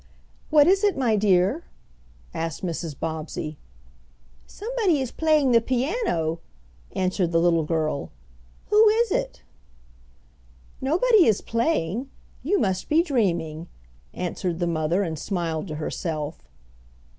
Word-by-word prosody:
"What 300 -2 +6
is 385 +3 +3
it, 405 -6 +2
my 240 -5 +2
dear?" 200 - +2 0.7
asked 165 +3 -4
Mrs. 165 -4 -4
Bobbsey. 155 -1 -4 0.9
"Somebody 425 - 0
is 260 -3 -3
playing 310 -4 +2
the 230 -1 +5
piano," 245 - -1 0.6
answered 185 -2 0
the 165 - +2
little 170 -1 +3
girl. 155 -3 -1 0.6
"Who 425 +1 +7
is 455 0 +2
it?" - - -2 1.4
"Nobody 370 - +4
is 215 -3 +2
playing. 230 - -1 0.3
You 370 +9 +1
must 190 -2 -1
be 320 +3 +4
dreaming," 170 - -1 0.4
answered 180 -1 -3
the 175 - -1
mother, 165 +3 0
and 160 -4 -4
smiled 170 -3 -3
to 155 - -5
herself. 150 - -4
195 Hz, 120 wpm, -24 LUFS, -, 1.4 s, Who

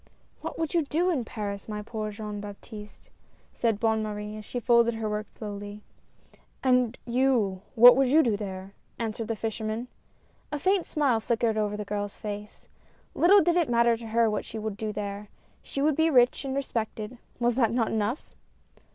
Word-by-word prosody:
" - - -36
What - - -5
would 325 -2 -2
you 340 - +4
do 345 +6 +1
in 275 -8 0
Paris, 205 -3 -5
my 210 -1 -4
poor 215 0 -4
dear 210 - -6
Jean 210 -1 -5
Baptiste," 210 +1 -10 0.4
said 225 -3 0
Bonne 220 -1 +2
Marie, 210 0 -4
as 215 - -8
she 245 - -4
folded 235 0 +4
her 225 -1 -3
work 210 0 -3
slowly. 205 -1 -7 0.8
"And 250 -2 +3
you, 235 -6 +1
what 245 +2 +10
would 270 0 +3
you 310 +5 +5
do 230 -4 +2
there? 195 -1 -6
" - - -39
answered 225 -1 -3
the 225 - -1
fisherman. 220 +2 -3 0.6
A 295 - -1
faint 375 +3 +1
smile 275 -7 +2
flickered 225 0 0
over 210 -1 -1
the 210 - -4
girl's 205 0 -4
face. 210 0 -7 0.5
Little 390 +4 +6
did 345 0 +2
it 335 -7 +2
matter 235 0 +4
to 230 0 -9
her 230 +1 +3
what 210 - -1
she 225 - -8
would 215 -1 -3
do 215 +1 -3
there. 205 0 -5 0.3
She 275 - -3
would 305 -1 +3
be 320 +2 +3
rich 250 -1 +4
and 265 0 -2
respected 230 -3 -3
— - - -34
was 240 -1 +2
not 230 -4 +3
that 230 -3 +2
enough 220 +5 -2
225 Hz, 195 wpm, -27 LUFS, 210-250 Hz, 0.8 s, what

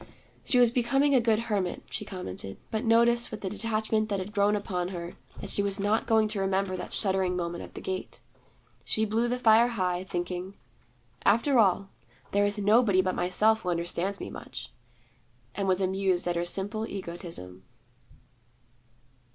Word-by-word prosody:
She 250 - +2
was 245 -2 +6
becoming 270 +4 +2
a 255 - +5
good 225 -1 +2
hermit, 200 -6 -2
she 210 - -3
commented; 95 - -5
but 220 +2 -1
noticed, 235 +1 +4
with 215 - -7
the 190 - -3
detachment 220 0 -1
that 200 - 0
had 190 +2 -5
grown 205 0 +2
upon 185 -4 -2
her, 175 -2 -6 0.3
that - - -4
she - - +1
was 200 0 +1
not 205 +3 +1
going 220 -1 +3
to 210 -1 -1
remember 195 0 0
that 180 - -6
shuddering 190 -3 0
moment 170 -1 -3
at - - -12
the - - -7
gate. 185 0 -5 0.6
She 220 - 0
blew 225 +3 0
the 245 +1 -1
fire 230 -1 +5
high, 185 -6 -1
thinking, 180 +1 -4 0.7
'After 235 +5 +3
all, 195 -1 +2 0.4
there 205 0 +3
is 205 +1 -2
nobody 205 -2 +4
but 185 0 0
Myself 215 +5 +2
who 180 - -3
understands 175 +3 -2
me - - -6
much,' - - -9 0.8
and 195 -1 -2
was 185 0 +2
amused 190 -1 +1
at 175 - 0
her 170 0 0
simple 205 +5 0
egotism. 170 - -5
200 Hz, 170 wpm, -28 LUFS, 185-220 Hz, 0.8 s, was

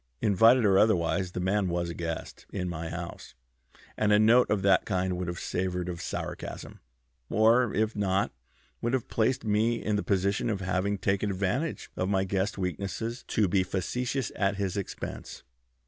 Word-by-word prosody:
Invited 115 +4 +5
or 95 -1 +5
otherwise, 90 -3 +2
the - - -3
man 95 +2 +1
was 85 0 -1
a - - -5
guest 85 -1 -5
in 90 -2 -3
my 85 -1 -4
house, 85 +1 -7 0.6
and 105 -1 +1
a 105 - +6
note 115 +4 +5
of 105 -3 +1
that 95 -2 +4
kind 90 0 -1
would 90 -1 -3
have 85 0 -4
savored 90 0 -2
of 85 -2 -5
sarcasm, - - -6 0.5
or, 115 +1 +4
if 110 +1 +1
not, 100 -1 +1 0.5
would 120 +2 -1
have 130 -3 0
placed 120 +2 0
me 110 +3 +2
in 105 -2 -1
the - - 0
position 100 +1 0
of 105 -3 -1
having 95 +2 0
taken 95 +2 0
advantage 100 - -2
of 90 - -1
my 95 -1 +2
guest's 95 +2 -1
weakness 100 +6 -3
to 105 -3 +2
be 95 +2 +2
facetious 125 +8 -2
at 100 -1 +1
his 100 -2 -2
expense." 100 -2 -6
100 Hz, 175 wpm, -28 LUFS, 90-110 Hz, 0.6 s, a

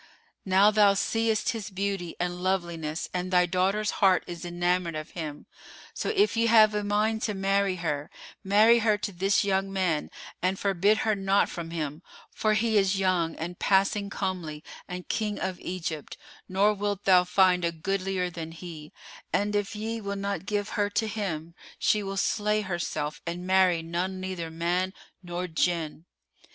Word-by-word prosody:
Now 195 +2 +5
thou 205 -2 +5
seest 225 +2 +1
his 225 -5 -3
beauty 195 -3 -3
and 180 0 -2
loveliness, 170 -4 -2
and 180 0 -2
thy 180 -1 +4
daughter's 190 +4 +1
heart 190 -2 +5
is 175 -2 -7
enamoured 175 -1 0
of 155 +1 -6
him; 155 -4 -6 0.5
so - - -3
if 415 - +2
ye 230 0 +2
have 215 -2 +6
a 210 0 -1
mind 215 +2 +1
to 210 -3 -1
marry 195 0 +1
her, 150 -4 -3 0.3
marry 215 +4 +5
her 215 -2 +2
to 205 0 -4
this 195 +2 +2
young 195 -1 0
man 180 -6 0 0.3
and 185 +1 +1
forbid 200 +2 +2
her 220 - +3
not 195 0 +2
from 170 -1 -6
him 155 -2 -4 0.3
for 215 -1 +1
he 220 0 +3
is 195 0 +1
young 180 -4 +1
and 175 +2 -6
passing 200 +1 +2
comely 175 -7 -4 0.2
and 180 0 -7
King 210 -2 -2
of 190 -1 -3
Egypt, 165 -4 -5 0.3
nor 200 +3 +3
wilt 205 -1 -2
thou 185 -2 +6
find 180 0 +3
a 170 - +1
goodlier 185 +2 -2
than 165 -1 -7
he; 165 -3 -9 0.4
and 205 +1 0
if 205 +1 -1
ye 225 +2 -3
will 200 -1 -3
not 200 0 -3
give 205 0 -1
her 205 -2 0
to 220 +2 0
him, 170 -6 -4 0.2
she 210 - +2
will 195 -1 -4
slay 210 +1 +1
herself 170 -6 -3
and 175 +1 -4
marry 185 -3 +3
none 180 +3 -3
neither 185 -3 -4
man 175 +3 -1 0.3
nor 175 0 -4
Jinn. 165 -1 -1
190 Hz, 170 wpm, -27 LUFS, 175-205 Hz, 0.5 s, have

